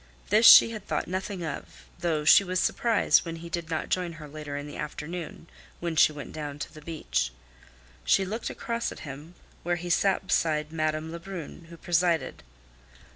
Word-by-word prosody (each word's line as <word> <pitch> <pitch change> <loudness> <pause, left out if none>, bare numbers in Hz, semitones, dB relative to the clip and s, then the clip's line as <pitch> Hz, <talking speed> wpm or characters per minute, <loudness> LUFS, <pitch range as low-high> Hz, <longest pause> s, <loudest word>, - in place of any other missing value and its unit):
This 220 +2 +6
she 230 - +10
had 215 -3 -8
thought - - -2
nothing 185 -1 -4
of, 155 - -7
though 155 -3 -1
she 200 - +8
was 185 -1 -1
surprised 230 +3 +3
when 165 -1 -5
he 170 +1 -9
did 170 -1 -4
not 160 -1 -3
join 180 -2 -1
her 155 -2 -10
later 145 -1 -6
in 145 - -5
the 145 - -9
afternoon, 160 +3 -6 0.3
when 170 -1 -3
she 155 - +6
went 145 -2 -9
down 145 -2 -6
to 145 - -7
the 155 - -12
beach. 150 - -2 0.7
She 195 - +3
looked 220 +5 -4
across 235 0 -3
at - - -10
him, 150 +4 -9 0.3
where 175 +1 0
he 175 0 -4
sat 190 +2 +2
beside 155 -4 0
Madame 155 0 -1
Lebrun, 170 -1 -8
who 170 - -11
presided. 170 -1 0
165 Hz, 180 wpm, -27 LUFS, 155-180 Hz, 0.7 s, she